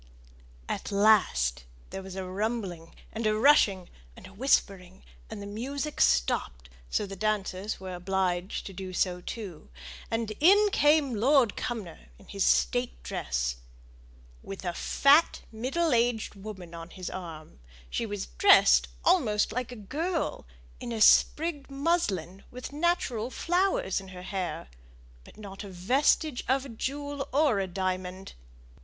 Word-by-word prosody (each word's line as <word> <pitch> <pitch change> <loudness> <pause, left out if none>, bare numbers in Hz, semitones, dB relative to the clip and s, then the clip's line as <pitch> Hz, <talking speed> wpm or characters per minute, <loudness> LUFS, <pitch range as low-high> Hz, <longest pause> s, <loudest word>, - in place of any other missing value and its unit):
At - - -4
last, 195 - +3 0.3
there 195 - -5
was 190 -1 -9
a 190 -1 -4
rumbling, 190 -4 -4 0.2
and 225 0 -1
a 215 - +2
rushing, 215 - +4 0.3
and - - -12
a 190 - -13
whispering, 195 - 0 0.3
and 205 - -7
the - - -7
music 270 +8 -4
stopped; - - +1 0.2
so 210 - 0
the 195 0 -7
dancers 205 -1 -2
were 185 -1 -7
obliged 180 0 -2
to 195 - -7
do 185 0 -7
so 180 0 0
too; 190 - -8 0.4
and 225 -1 -2
in 405 +6 +6
came 295 -5 +3
Lord 245 0 +3
Cumnor 195 - -6
in - - -19
his - - -2
state - - +1
dress, 60 0 -2 0.8
with 195 -1 -8
a 175 - -1
fat, 285 - +3
middle 265 +8 0
aged 235 -1 +1
woman 195 -4 -9
on 165 0 -8
his 185 0 -7
arm; 165 -4 -9 0.3
she 230 - -2
was 205 -2 -4
dressed 400 0 +5 0.2
almost 240 - +3
like 250 +1 -3
a - - -7
girl 305 - -3 0.3
in 240 - -6
a 225 - -3
sprigged 295 +6 +4
muslin, 240 - -1
with 250 +3 -8
natural 290 -8 0
flowers 380 - 0
in 190 - -12
her 180 -1 -10
hair, 185 - -4 0.6
but - - -17
not 200 -2 -9
a 200 - -8
vestige 250 - +1
of 265 +2 +1
a - - -9
jewel 280 +4 -4
or 275 -6 +3
a 195 - -1
diamond. 185 0 -4
210 Hz, 145 wpm, -28 LUFS, 185-270 Hz, 0.8 s, in